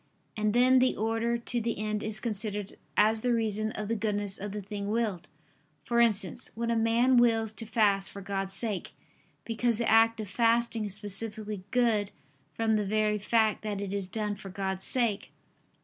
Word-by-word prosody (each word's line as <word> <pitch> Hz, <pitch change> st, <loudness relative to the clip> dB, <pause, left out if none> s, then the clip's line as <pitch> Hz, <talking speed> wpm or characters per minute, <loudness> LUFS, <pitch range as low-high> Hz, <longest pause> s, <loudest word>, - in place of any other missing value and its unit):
And 215 Hz, 0 st, 0 dB
then 255 Hz, +1 st, +5 dB
the 255 Hz, 0 st, +2 dB
order 225 Hz, +2 st, 0 dB
to 235 Hz, 0 st, -3 dB
the 230 Hz, 0 st, -2 dB
end 210 Hz, 0 st, -2 dB
is 215 Hz, 0 st, -2 dB
considered 210 Hz, -2 st, -4 dB, 0.2 s
as 220 Hz, +1 st, +4 dB
the 245 Hz, -, +1 dB
reason 215 Hz, -2 st, 0 dB
of 210 Hz, -1 st, -4 dB
the 230 Hz, -, -1 dB
goodness 205 Hz, -2 st, -2 dB
of 205 Hz, +1 st, -5 dB
the 210 Hz, -, -4 dB
thing 200 Hz, 0 st, -5 dB
willed: 215 Hz, -5 st, -1 dB, 0.6 s
for 235 Hz, 0 st, 0 dB
instance, 210 Hz, -7 st, +3 dB
when 235 Hz, +1 st, -1 dB
a -, -, +1 dB
man 230 Hz, +3 st, +3 dB
wills 225 Hz, -2 st, +3 dB
to 225 Hz, 0 st, -4 dB
fast 200 Hz, -3 st, +2 dB
for 200 Hz, -, -9 dB
God's 195 Hz, 0 st, -3 dB
sake; 210 Hz, -5 st, -2 dB, 0.5 s
because 230 Hz, 0 st, 0 dB
the 235 Hz, -, -1 dB
act 225 Hz, 0 st, +4 dB
of 215 Hz, -, -4 dB
fasting 230 Hz, +1 st, +1 dB
is 200 Hz, -2 st, -4 dB
specifically 210 Hz, -1 st, -4 dB
good 225 Hz, -4 st, +2 dB, 0.4 s
from 220 Hz, +4 st, +1 dB
the 210 Hz, -, 0 dB
very 210 Hz, 0 st, +1 dB
fact 220 Hz, +1 st, +2 dB
that 210 Hz, -2 st, -3 dB
it 200 Hz, -1 st, -4 dB
is 200 Hz, -2 st, 0 dB
done 210 Hz, +1 st, -2 dB
for 200 Hz, -1 st, -9 dB
God's 190 Hz, 0 st, -3 dB
sake. 230 Hz, -5 st, 0 dB
215 Hz, 185 wpm, -29 LUFS, 205-230 Hz, 0.6 s, then